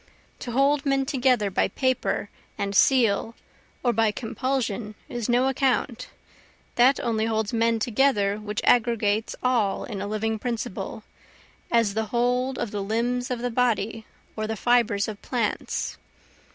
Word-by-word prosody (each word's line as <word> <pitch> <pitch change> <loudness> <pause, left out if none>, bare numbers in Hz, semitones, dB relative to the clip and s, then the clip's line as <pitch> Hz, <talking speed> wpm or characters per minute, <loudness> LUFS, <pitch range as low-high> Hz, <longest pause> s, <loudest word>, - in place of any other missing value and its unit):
To 240 - -5
hold 275 +2 +3
men 275 -2 +1
together 250 -7 +1
by - - +2
paper 260 -5 -1 0.3
and 200 0 -2
seal 230 -2 +3 0.5
or 240 -2 +2
by 225 -1 +3
compulsion 225 -1 -2
is 240 -5 -4
no 245 +2 +3
account, 255 -2 0 0.7
That 255 +3 +4
only 225 -2 0
holds 220 0 -1
men 230 0 +2
together 210 -3 +1
which 210 -1 -4
aggregates 225 -3 +2
all 235 -6 +1
in 205 -5 -5
a 200 - -3
living 220 +1 -2
principle, 235 -1 -4 0.7
as 230 -4 +2
the 220 +1 -1
hold 250 +2 0
of 235 -4 -3
the 205 - -3
limbs 240 +4 -1
of 245 -1 -3
the 245 - -1
body 225 -2 0 0.3
or 215 0 -3
the 220 - -2
fibres 230 -3 +2
of 210 -2 -7
plants. 235 -5 -2
230 Hz, 145 wpm, -25 LUFS, 215-250 Hz, 0.7 s, That